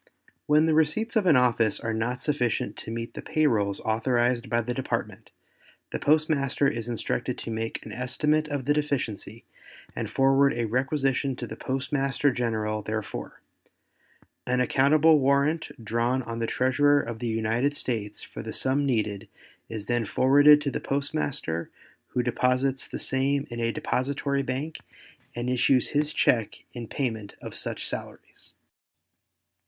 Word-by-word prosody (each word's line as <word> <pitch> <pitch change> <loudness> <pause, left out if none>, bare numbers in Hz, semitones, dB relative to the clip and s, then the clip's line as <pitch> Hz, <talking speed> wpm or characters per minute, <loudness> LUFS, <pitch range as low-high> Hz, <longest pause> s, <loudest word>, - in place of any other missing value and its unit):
When 150 +1 +5
the 160 - +2
receipts 160 +10 +1
of 210 -4 +2
an 160 - +6
office 120 -3 +3
are 115 - -2
not 120 +3 -2
sufficient 125 -6 0
to - - -8
meet 115 +1 -5
the - - -6
pay 155 0 0
rolls 100 -7 +1
authorized 120 +2 +1
by 120 +1 +2
the 120 +2 -3
Department, 130 +1 -4 0.6
the - - -3
postmaster 145 -2 +2
is 115 -2 -2
instructed 115 - -2
to 115 - -6
make 115 0 -4
an 110 - -8
estimate 150 +6 0
of 145 -4 -3
the 145 - +3
deficiency 125 -7 -2 0.5
and - - -3
forward 135 0 +3
a 120 - 0
requisition 135 +2 0
to - - -5
the - - -7
Postmaster 135 +1 0
General 110 -3 -1
therefor. 110 0 -5 1.1
An 125 +1 +1
accountable 145 +5 +4
warrant 140 +4 +2 0.2
drawn 120 +4 0
on 115 -1 -5
the 115 - -1
Treasurer 145 +4 +3
of 115 -4 -5
the 120 - -3
United 115 +5 0
States 110 -6 -3
for - - -8
the - - -6
sum 140 +2 +1
needed 105 -4 -1 0.4
is 110 -2 -6
then 120 -1 0
forwarded 145 +5 +6
to 140 -1 -1
the - - -2
postmaster 140 - -2 0.4
who 125 - -1
deposits 125 +2 +1
the - - -5
same 135 +1 0
in 120 - -5
a 115 0 +1
depository 140 +3 -1
bank 135 +4 -3 0.6
and 120 +1 -3
issues 125 0 +2
his 150 +1 0
check 115 -7 +2 0.2
in 120 -2 -6
payment 110 -7 -3
of - - -8
such - - -4
salaries. - - -8
130 Hz, 155 wpm, -26 LUFS, 115-145 Hz, 1.1 s, an